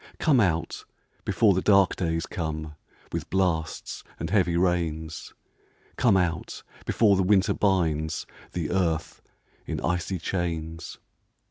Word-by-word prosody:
Come 145 -6 +3
out, 85 -6 0 0.4
before 105 -4 +4
the 95 - 0
dark 100 -2 +4
days 80 -2 -1
come, 80 -2 -4 0.4
With - - -4
blasts 85 -4 -1 0.2
and 80 - -4
heavy 90 -5 +3
rains: 80 -3 -1 0.6
Come 115 -6 +4
out, 85 -2 -2 0.2
before 105 -4 +4
the 95 - +2
winter 95 +1 +3
binds 80 -6 +1 0.3
The 85 -3 -2
earth 85 -4 -1 0.5
in - - -2
icy 90 +2 -1
chains. 80 -2 -3
85 Hz, 120 wpm, -26 LUFS, 80-95 Hz, 0.6 s, before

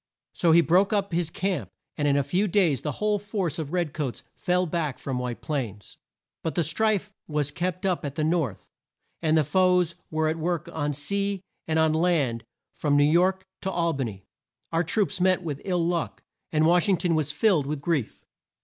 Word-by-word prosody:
So 170 - +3
he 170 +1 +7
broke 185 +4 +3
up 200 -3 0
his 170 -1 0
camp, 170 - -2 0.3
and 145 - 0
in 140 0 +3
a 140 - +2
few 180 +9 +1
days 175 - +2
the 150 - -3
whole 210 +5 0
force 195 - -2
of 155 -2 -4
red 175 -5 -1
coats 135 -5 -3
fell 180 0 +1
back 160 -5 -2
from 130 -2 -3
White 125 -1 -4
Plains. 115 -10 -4 0.4
But 160 - -3
the 170 - +2
strife 205 +5 +1 0.2
was 150 -2 -1
kept 180 +3 -3
up 185 -3 0
at 140 -2 -4
the 155 - -1
North, 155 - 0 0.6
and 160 -1 +3
the 155 - +4
foes 180 +2 +3 0.2
were 155 0 0
at 160 +1 -1
work 170 +1 -1
on 145 -2 -1
sea 200 +7 -1 0.3
and 160 0 +1
on 160 -1 +3
land 155 -9 +1 0.3
from 145 -2 +1
New 145 - +5
York 185 +5 +3 0.2
to 190 - -2
Al 170 -2 +1
ba 135 -3 -1
ny. 95 -4 -7 0.5
Our 165 +1 +2
troops 195 +2 0
met 185 0 +3
with 145 -4 -4
ill 180 -3 +1
luck, 170 -1 -2 0.3
and 155 0 +3
Wash 175 +3 +4
ing 190 - +4
ton 175 -1 0
was 155 -2 +1
filled 155 -3 +2
with 150 0 -2
grief. 140 -5 -2
165 Hz, 205 wpm, -26 LUFS, 145-180 Hz, 0.6 s, he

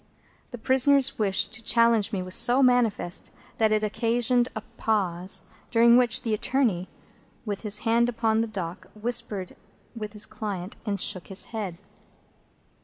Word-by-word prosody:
The 245 - -8
prisoner's 265 +2 +3
wish 195 -3 +2
to 235 - -8
challenge 230 -2 +3
me 190 -4 -2
was 185 0 -4
so 250 +7 +3
manifest, 240 -8 +1 0.3
that 220 -1 +3
it 215 0 +1
occasioned 240 +3 +1
a 220 - -4
pause, 185 -4 -1 0.3
during 235 0 +5
which 245 -2 +4
the 225 - -1
attorney, 215 -5 0 0.6
with 205 -3 -4
his 210 -1 0
hand 235 +1 +3
upon 225 -1 0
the 230 - -1
dock, 185 -5 -6
whispered 210 -4 -2 0.4
with 215 -2 -6
his 210 0 -1
client, 195 -3 -6
and 200 -1 -1
shook 185 -1 -2
his 195 0 -3
head. 200 -6 -4
220 Hz, 150 wpm, -26 LUFS, 200-235 Hz, 0.6 s, during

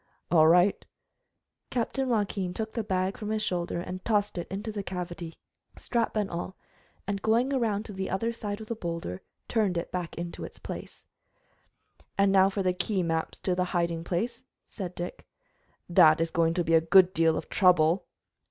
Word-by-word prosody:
"All 160 -2 +6
right." 180 +4 +4 0.9
Captain 255 +2 -1
Joaquin 200 -5 -1
took 220 0 -4
the 230 - -2
bag 190 -1 -1
from 210 -2 -4
his 215 0 0
shoulder 175 -3 -1
and 180 +1 -6
tossed 210 -2 +1
it 175 - -5
into 205 +4 -4
the 210 -1 -4
cavity, 175 -3 -6 0.4
strap 235 -3 -1
and 210 -2 +1
all, 175 +1 -5 0.5
and 200 0 -2
going 235 +6 +2
around 220 -5 0
to 210 - -8
the 190 0 -3
other 225 +5 -1
side 205 -2 -5
of 220 - -8
the 230 - -3
boulder, 170 - -4 0.3
turned 205 -6 +1
it 170 - -3
back 180 -2 -4
into 170 0 -6 0.2
place. - - -8 1.1
"Now 195 -1 +5
for 195 0 -2
the 185 -1 +2
key 190 +1 0
maps 165 -1 -2
to 185 - 0
the 180 0 +1
hiding 170 -1 0
place," 235 +9 -2 0.2
said 185 -4 -6
Dick. 175 +1 -6 0.6
"That 155 -3 +6
is 165 0 0
going 165 0 +2
to 170 -2 +1
a 165 - +6
good 185 +2 +6
deal 165 -3 +3
of - - -5
trouble." 180 -1 +3
185 Hz, 175 wpm, -28 LUFS, 170-210 Hz, 1.1 s, All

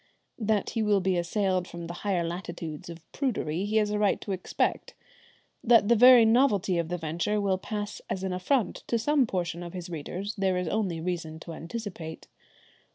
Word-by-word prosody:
That 215 -2 0
he 225 - -1
will 210 -2 +3
be 190 0 +1
assailed 185 +1 0
from 170 0 -7
the 170 - -6
higher 190 -4 0
latitudes 170 -2 -6
of 165 -1 -9
prudery 200 - -1
he 210 +1 -2
has 210 -1 +3
a 210 - 0
right 205 -1 +2
to 200 - -5
expect. 185 -1 -2 0.7
That 230 -3 +5
the 235 - +6
very 245 0 +8
novelty 210 -6 +3
of 170 - -1
the 180 - -2
venture 170 +6 -1
will 195 -2 +1
pass 205 +1 -5
as 190 - -3
an 190 -1 -1
affront 200 +5 0
to 235 - +1
some 275 +2 +2
portion 175 -3 -2
of 175 -1 -7
his 180 -1 -7
readers 180 +6 -4
there 190 -2 +1
is 180 -1 -2
only 185 -3 -1
reason 165 -2 -4
to 165 - -8
anticipate. 170 -2 -7
190 Hz, 190 wpm, -28 LUFS, 170-210 Hz, 0.7 s, very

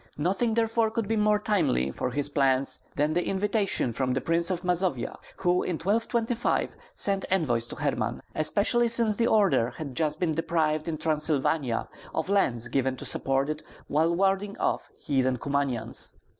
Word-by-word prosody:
Nothing 195 +9 +1
therefore 225 0 +2
could 225 -1 -2
be 225 - 0
more 210 0 +3
timely 180 - +1
for 70 - -2
his 145 +3 -1
plans 135 -2 +1 0.2
than 150 +2 +1
the 175 +2 +1
invitation 195 - 0
from 130 +1 0
the - - +1
Prince 170 +4 0
of 180 -2 -2
Mazovia, 180 -7 0 0.2
who 180 -1 +2
in 180 - -2
1225 225 +5 0 0.2
sent 195 -1 +1
envoys 125 -11 +1
to - - -7
Herman; 120 -6 -1
especially 215 +9 +2
since 230 -2 +3
the 235 - +2
order 195 - +3
had 145 -4 -6
just 155 +2 -1
been 170 -3 +1
deprived 155 -1 0
in 160 -2 -2
Transylvania 150 -4 0 0.3
of - - -1
lands 125 - +2
given 130 0 0
to - - -8
support 135 +1 0
it 155 0 -3 0.3
while 160 +3 +2
warding 195 +2 +1
off - - -1
heathen 130 -2 +1
Kumanians. 135 -4 -2
165 Hz, 165 wpm, -27 LUFS, 135-200 Hz, 0.3 s, more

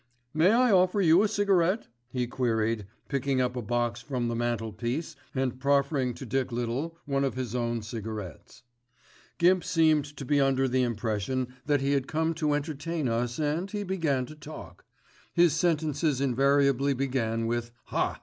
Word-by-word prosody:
"May 160 +4 +4
I 245 +1 +4
offer 185 +1 +4
you 170 -1 +6
a 215 - +3
cigarette?" 200 -1 +2 0.2
he 125 0 -1
queried, 115 -4 -1 0.2
picking 140 -1 0
up 125 0 0
a 125 - -2
box 120 +1 -1
from 125 -4 -2
the 120 - -2
mantelpiece 120 +6 -2 0.2
and 130 -1 -1
proffering 140 -2 +1
to 135 - -8
Dick 130 +2 -1
Little 125 +8 -3
one 140 -1 0
of 135 - -1
his 125 -3 -4
own 120 -2 -1
cigarettes. 110 -5 -7 0.7
Gimp 180 0 +4
seemed 155 -3 +3
to 135 - -6
be 145 +2 +3
under 135 -1 +2
the 130 0 +1
impression 120 +2 -1
that 145 -2 +2
he 135 +1 +1
had 135 -2 +1
come 160 +1 0
to 155 -2 0
entertain 150 +1 -2
us 120 +1 -1
and 155 +5 -1
he 205 -1 -3
began 160 -9 0
to 155 - -10
talk. 150 +1 -11 0.5
His 170 -3 +5
sentences 155 -3 +1
invariably 140 +1 +3
began 120 -4 -1
with 120 0 -1 0.2
"Haaa! - - 0
135 Hz, 165 wpm, -28 LUFS, 120-155 Hz, 0.7 s, you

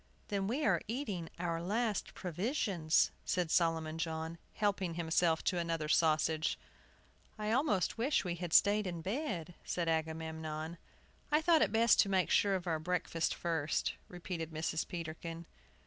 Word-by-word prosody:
"Then 195 -1 -1
we 275 +8 0
are - - +3
eating 210 - -3
our 170 -1 -2
last 215 +4 -1
provisions," 180 - +1
said 175 -3 0
Solomon 165 -2 +1
John, 160 0 -3 0.2
helping 195 -5 0
himself 165 -1 +2
to 180 - +1
another 165 -2 -1
sausage. 155 0 +2 0.8
"I 215 0 -2
almost 230 - +1
wish 260 -1 +2
we 175 - -1
had 175 -1 -5
stayed 205 +3 +5
in 170 -2 -5
bed," 190 - -3
said 175 -2 -2
Agamemnon. 160 0 -3 0.5
"I 300 - +5
thought 320 0 +4
it - - +3
best 225 0 +4
to 200 - +5
make 190 -2 +2
sure 200 -1 +4
of 185 -1 -3
our 165 -3 0
breakfast 165 -1 -1
first," 160 -3 -1
repeated 175 -2 -5
Mrs. 160 0 -2
Peterkin. 165 -1 -6
170 Hz, 145 wpm, -34 LUFS, 160-200 Hz, 0.8 s, stayed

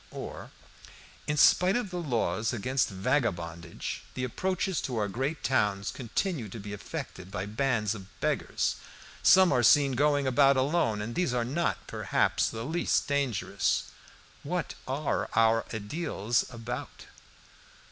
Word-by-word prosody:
Or - - -7 0.8
"In 150 0 0
spite 180 +6 +5
of 240 -6 -1
the 180 - -3
laws 115 - 0
against 125 +3 0
vagabondage, 90 - -2
the 130 - -3
approaches 185 +6 -1
to 125 -3 -3
our 105 -1 +1
great 135 +9 -3
towns 105 -6 +1
continue 130 - -2
to 110 - -8
be 105 0 -7
infected 95 -1 -7
by 90 0 -4
bands 110 -1 0
of 95 -4 -9
beggars. - - 0 0.4
Some 190 -1 +6
are 125 -3 +3
seen 140 +3 +5
going 145 +2 +2
about 135 +1 +4
alone, 130 -7 +1
and 115 +3 -5
these 160 -6 0
are 120 -1 +1
not, 160 +8 -1
perhaps, - - +1
the 115 0 -5
least 165 +5 0
dangerous. 140 -8 0 0.5
What 170 +1 -3
are 140 +3 -1
our 115 0 +3
ediles 110 - -1
about?" 115 0 -6
125 Hz, 135 wpm, -29 LUFS, 105-145 Hz, 0.8 s, Some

